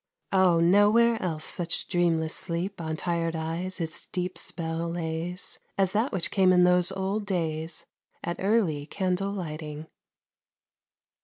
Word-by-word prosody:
Oh! 185 Hz, -3 st, +5 dB
nowhere 210 Hz, +6 st, +4 dB
else 160 Hz, -4 st, -1 dB
such 170 Hz, -1 st, +1 dB
dreamless 165 Hz, -3 st, +1 dB
sleep 185 Hz, +1 st, -2 dB
On 160 Hz, -1 st, -3 dB
tired 165 Hz, 0 st, -1 dB
eyes 165 Hz, +4 st, -3 dB
its 160 Hz, -1 st, -3 dB
deep 180 Hz, 0 st, -3 dB
spell 165 Hz, 0 st, -3 dB
lays, 170 Hz, +1 st, -3 dB, 0.2 s
As 190 Hz, -2 st, +2 dB
that 220 Hz, +6 st, +1 dB
which 175 Hz, -4 st, 0 dB
came 190 Hz, -1 st, +4 dB
in 180 Hz, -1 st, +5 dB
those 180 Hz, +1 st, +4 dB
old 195 Hz, +2 st, -2 dB
days 165 Hz, -2 st, -2 dB, 0.4 s
At 170 Hz, -, -3 dB
early 190 Hz, -8 st, +1 dB
candle 190 Hz, +1 st, -1 dB
lighting. 155 Hz, -5 st, -6 dB
175 Hz, 135 wpm, -27 LUFS, 165-190 Hz, 0.4 s, Oh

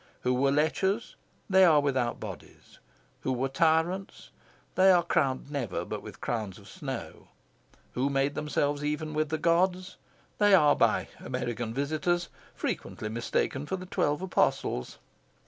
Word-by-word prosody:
Who 125 Hz, -, +1 dB
were 135 Hz, +2 st, +2 dB
lechers, 190 Hz, +9 st, +1 dB, 0.3 s
they 190 Hz, -1 st, +5 dB
are 160 Hz, -5 st, +6 dB
without 130 Hz, -4 st, 0 dB
bodies; -, -, -10 dB, 0.4 s
who 130 Hz, -, -2 dB
were 130 Hz, +1 st, -1 dB
tyrants, 165 Hz, +6 st, 0 dB, 0.4 s
they 190 Hz, +1 st, +5 dB
are 175 Hz, -2 st, +5 dB
crowned 140 Hz, -4 st, 0 dB
never 110 Hz, -, -3 dB
but -, -, -5 dB
with -, -, -11 dB
crowns 110 Hz, -6 st, -3 dB
of 100 Hz, -, -15 dB
snow; 135 Hz, -9 st, -7 dB, 0.6 s
who 130 Hz, +3 st, 0 dB
made 140 Hz, +1 st, +1 dB
themselves 145 Hz, -1 st, -1 dB
even 150 Hz, +1 st, -2 dB
with 155 Hz, 0 st, 0 dB
the 160 Hz, -, -1 dB
gods, 180 Hz, +3 st, +1 dB, 0.4 s
they 205 Hz, -1 st, +6 dB
are 150 Hz, -5 st, +5 dB
by -, -, +2 dB
American 120 Hz, -2 st, -3 dB
visitors 155 Hz, +7 st, -1 dB, 0.3 s
frequently 110 Hz, -, -4 dB
mistaken 120 Hz, +5 st, -1 dB
for 190 Hz, -, -1 dB
the 185 Hz, -1 st, -7 dB
Twelve 150 Hz, -2 st, 0 dB
Apostles. 115 Hz, -, 0 dB
145 Hz, 145 wpm, -29 LUFS, 130-175 Hz, 0.6 s, are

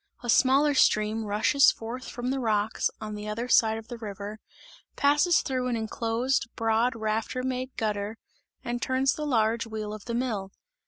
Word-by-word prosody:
A 240 Hz, -, +1 dB
smaller 275 Hz, +4 st, +4 dB
stream, 215 Hz, -3 st, +2 dB
rushes 215 Hz, +7 st, +4 dB
forth 240 Hz, +3 st, -7 dB
from 245 Hz, +1 st, -3 dB
the 270 Hz, -, -1 dB
rocks 215 Hz, -3 st, 0 dB
on 215 Hz, -1 st, -6 dB
the 210 Hz, 0 st, -6 dB
other 225 Hz, +3 st, -3 dB
side 220 Hz, -2 st, +4 dB
of 225 Hz, 0 st, -9 dB
the 235 Hz, 0 st, -8 dB
river, 205 Hz, 0 st, -7 dB, 0.6 s
passes 295 Hz, +5 st, +3 dB
through 255 Hz, -1 st, -1 dB
an 245 Hz, -, 0 dB
enclosed, 230 Hz, +3 st, -1 dB
broad 225 Hz, +2 st, +1 dB
rafter 220 Hz, +3 st, -2 dB
made 255 Hz, 0 st, -3 dB
gutter 210 Hz, 0 st, -2 dB, 0.5 s
and 240 Hz, -1 st, -3 dB
turns 260 Hz, +1 st, +1 dB
the 300 Hz, -1 st, -4 dB
large 230 Hz, -3 st, +1 dB
wheel 215 Hz, -1 st, -5 dB
of 215 Hz, -1 st, -9 dB
the 235 Hz, -, -3 dB
mill. 215 Hz, -6 st, -2 dB
230 Hz, 170 wpm, -27 LUFS, 215-255 Hz, 0.6 s, smaller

